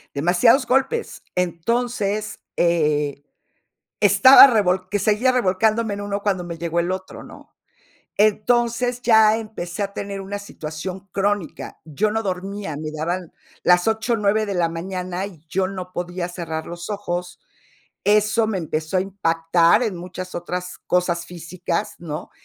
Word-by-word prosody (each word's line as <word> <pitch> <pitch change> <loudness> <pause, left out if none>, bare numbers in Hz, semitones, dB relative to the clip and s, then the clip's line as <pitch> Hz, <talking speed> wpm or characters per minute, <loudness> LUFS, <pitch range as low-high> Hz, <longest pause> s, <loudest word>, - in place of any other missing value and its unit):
Demasiados 180 - +4
golpes. 270 - 0
Entonces, 210 +4 -1 0.2
eh, 150 -4 +1 0.8
estaba 270 +1 +9
revolc 190 -6 +1
que 205 - 0
seguía 215 +5 +2
revolcándome 220 0 +1
en 200 - -6
uno, 205 0 -3
cuando 195 -3 0
me 170 -1 -6
llegó 170 0 -1
el 175 +2 0
otro, 190 0 -6
¿no? - - -15 0.6
Entonces, 240 +3 +2
ya 220 -2 +5
empecé 215 -4 -5
a 200 0 -3
tener 200 -1 -5
una 200 +1 -5
situación 185 0 -7
crónica. 200 -3 -2
Yo 180 +7 -1
no 220 +1 -1
dormía, 195 -3 -4
me 155 +1 -5
daban 165 +3 -3 0.3
las 180 +2 +4
8, 220 +2 0
9 215 0 +1
de 200 - -3
la 170 -2 +1
mañana, 180 +2 -4
y 170 -6 -13
yo 190 +2 0
no 185 -2 -7
podía 175 0 -4
cerrar 165 -3 -5
los 175 +3 -7
ojos. 180 -3 -4 0.7
Eso 215 +2 +3
me 215 -3 -1
empezó 155 +1 -2
a - - +3
impactar 170 0 +2
en 215 -6 -2
muchas 180 +1 -7
otras 180 +1 -5
cosas 175 -1 +1
físicas, 175 +3 -4
¿no? 155 -3 -6
185 Hz, 145 wpm, -22 LUFS, 175-215 Hz, 0.8 s, estaba